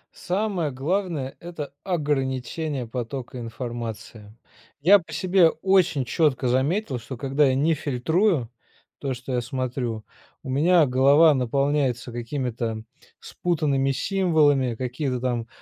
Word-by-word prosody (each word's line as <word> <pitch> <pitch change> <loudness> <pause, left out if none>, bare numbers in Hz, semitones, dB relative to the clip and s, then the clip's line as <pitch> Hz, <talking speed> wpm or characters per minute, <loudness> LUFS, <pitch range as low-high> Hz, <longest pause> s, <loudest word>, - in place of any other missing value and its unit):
Самое 185 -4 -1
главное- 150 0 -2
это 160 -5 -7
ограничение 140 -3 -2
потока 125 +2 -5
информации. 115 -2 -7 0.4
Я 195 +7 +6
по 165 -2 -14
себе 175 +1 +4
очень 185 -9 +2
четко 140 -1 +1
заметил, 135 - 0
что 125 +2 -8
когда 135 +3 +2
я 130 - +2
не 155 +5 +2
фильтрую, 150 - 0 0.5
то 135 -2 -3
что 125 +1 -6
я 125 - +1
смотрю, 120 -3 -3 0.4
у - - -7
меня 160 +4 +4
голова 140 +5 +5
наполняется 135 -1 0
какими-то 120 -2 -3 0.4
спутанными 145 -6 -1
символами, 145 - +2
какие-то 125 +1 -3
там 120 -2 -2
135 Hz, 115 wpm, -24 LUFS, 125-160 Hz, 0.5 s, Я